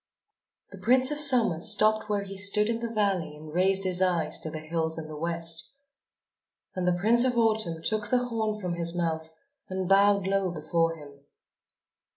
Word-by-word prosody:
The - - -12
Prince 255 +3 +3
of 295 - -3
Summer 240 - +5
stopped 215 +2 +5
where 205 -1 -2
he 195 0 -9
stood 200 +2 +2
in 230 0 -2
the 235 0 -5
valley 195 -8 -2
and 155 0 -13
raised 190 +2 +1
his 185 -1 +1
eyes 175 -4 0
to 160 - -6
the 155 - -7
hills 160 +1 -3
in 160 -1 -7
the 155 - -10
West. 165 - -3 1.0
And 180 -1 -4
the 180 - +2
Prince 235 +5 +3
of 250 -2 -1
Autumn 215 -8 -1
took 215 +2 -3
the 250 -1 0
horn 220 -2 -3
from 180 -3 -4
his 170 0 -3
mouth 160 -2 -3 0.4
and 185 -1 -4
bowed 200 0 +3
low 195 -1 -1
before 165 0 -2
him. 145 -3 -15
190 Hz, 185 wpm, -26 LUFS, 165-215 Hz, 1.0 s, Summer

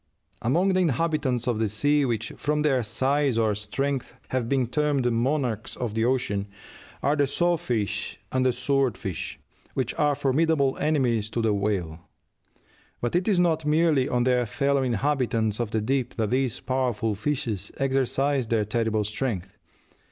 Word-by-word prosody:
Among 175 +11 +2
the 185 - +2
inhabitants 145 -6 0
of 120 -3 0
the 110 -2 +1
sea 145 +8 +2
which, 115 -3 -2
from 150 +1 0
their 135 -4 +3
size 130 +3 +1
or 110 -2 +2
strength, 130 +6 -3
have 125 -3 -1
been 135 -2 +2
termed 145 +1 0
"monarchs 120 -2 -1
of 120 -4 -3
the 110 +1 +1
ocean," 110 -6 0 0.6
are 145 - +3
the 145 -2 +2
saw 175 +5 +1
fish 115 -10 -2
and 130 0 +1
the 130 - +3
sword 125 -2 0
fish, 95 -4 -5 0.4
which 130 -3 -1
are 145 -1 +3
formidable 140 0 +2
enemies 125 -8 +1
to 120 - -3
the 110 -2 +2
whale; 100 -6 -1 1.0
but 120 +6 -2
it 180 +1 +1
is 200 -5 +3
not 165 -3 +2
merely 150 -3 +2
on 125 -1 +1
their 125 -1 +2
fellow 140 +4 +1
inhabitants 120 -4 0
of 120 -3 -1
the 110 0 -1
deep 125 +2 -1
that 110 -3 -1
these 130 -1 0
powerful 125 -4 0
fishes 110 -3 -2
exercise 135 0 +1
their 110 -2 +1
terrible 110 0 0
strength. 105 -2 -3
130 Hz, 160 wpm, -26 LUFS, 110-145 Hz, 1.0 s, their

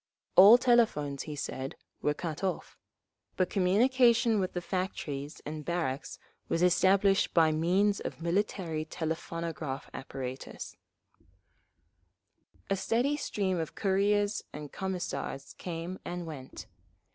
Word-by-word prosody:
'" - - -52
All 200 +6 +10
telephones, 220 - +2
he 150 - -4
said, 135 -1 -4 0.3
were 150 - +1
cut 165 +2 -5
off: 190 - -2 0.6
but 185 -1 +1
communication 230 +3 +4
with 185 -1 -1
the 175 - -1
factories 165 -6 -4
and 150 0 -5
barracks 160 -5 -2 0.3
was 165 - +1
established 195 +2 +4
by 160 -2 +5
means 185 +6 +2
of - - -6
military 170 -2 -1
telephonograph 160 -3 -4
apparatus…. 130 -1 -6 1.9
A 195 - +1
steady 240 +9 +1
stream 190 - -1
of 160 - -4
couriers 205 +1 +1
and 150 -1 -8
Commissars 180 -7 -4
came 175 +1 -5
and 175 0 -5
went. 140 -5 -8
175 Hz, 115 wpm, -30 LUFS, 155-200 Hz, 1.9 s, All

